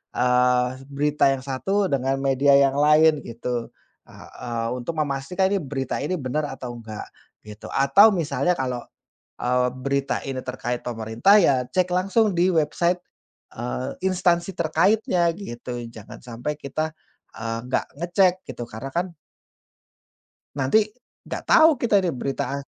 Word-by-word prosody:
eee, 125 0 +3 0.2
berita 145 0 +2
yang 130 -1 -6
satu 190 +10 0
dengan 135 0 0
media 140 +1 +3
yang 135 -1 +3
lain, 150 +1 +5
gitu, 120 0 -4 0.4
eee - - -14 0.2
eee, 115 -1 -2
untuk 125 +7 -4
memastikan, 150 +6 0
nih, 200 -3 +1
berita 135 -1 -3
ini 185 +5 -1
benar 145 +3 -2
atau 125 -2 -7
enggak, 110 -2 -8 0.4
gitu. 105 0 -10
Atau 140 +11 +6
misalnya 175 +2 0
kalau, 125 -2 -2 0.6
eee, 125 0 +2
berita 140 +1 -1
ini 130 -1 -3
terkait 125 -1 -4
pemerintah, 115 - +2
ya, 130 -7 +3
cek 185 -1 +1
langsung 195 +3 +2
di 180 +2 +3
website, 170 +3 +1 0.6
eee, 60 +1 -3 0.2
instansi 180 -1 +1
terkaitnya, 170 +2 +2
gitu, 120 -9 -6
jangan 110 -2 -12
sampai 120 +5 -4
kita, 155 +3 -3 0.4
eee, 115 0 -3
enggak 125 - -1 0.2
ngecek, 180 +1 +3
gitu, 120 - -6
karena 120 +5 -7
kan 175 0 -2 1.4
nanti 135 +9 +3 0.5
enggak - - -5
tau 320 +1 +7
kita, 230 -4 +2
ini 180 - 0
berita 135 +2 -3
a 140 - -2
140 Hz, 140 wpm, -23 LUFS, 125-175 Hz, 1.4 s, tau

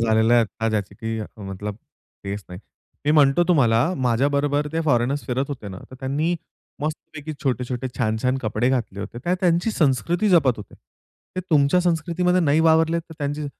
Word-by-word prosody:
झालेला 110 +1 +3
आहे 120 - +6
आता 110 +1 -3
ज्याची 100 -2 -2
की 115 +1 -4 0.2
मतलब 100 +2 -5 0.5
तेच 100 +1 -4
नाही. 90 +1 -9 0.4
मी 150 - +2
म्हणतो 145 +1 +5
तुम्हाला, 125 -2 +3
माझ्याबरोबर 140 +3 +1
ते 165 - 0
फॉरेनर्स 135 0 +1
फिरत 130 +1 0
होते 130 -8 -6
ना, 95 - -8
तर - - -10
त्यांनी 150 +6 0 0.5
मस्तपैकी 155 0 -5
छोटे-छोटे, 125 -1 -2
छान-छान 125 +2 0
कपडे 110 +2 0
घातले 115 -6 -1
होते. 120 - -6
ते 175 - +2
त्यांची 175 +3 +2
संस्कृती 170 - +1
जपत 160 -9 +5
होते. 105 - -11 0.6
ते - - 0
तुमच्या 145 +3 +4
संस्कृतीमध्ये 180 +1 +1
नाही 155 -1 +3
वावरले 160 +1 +4
तरी 165 0 -10
त्यांची 145 +1 -3
140 Hz, 165 wpm, -23 LUFS, 115-160 Hz, 0.6 s, आहे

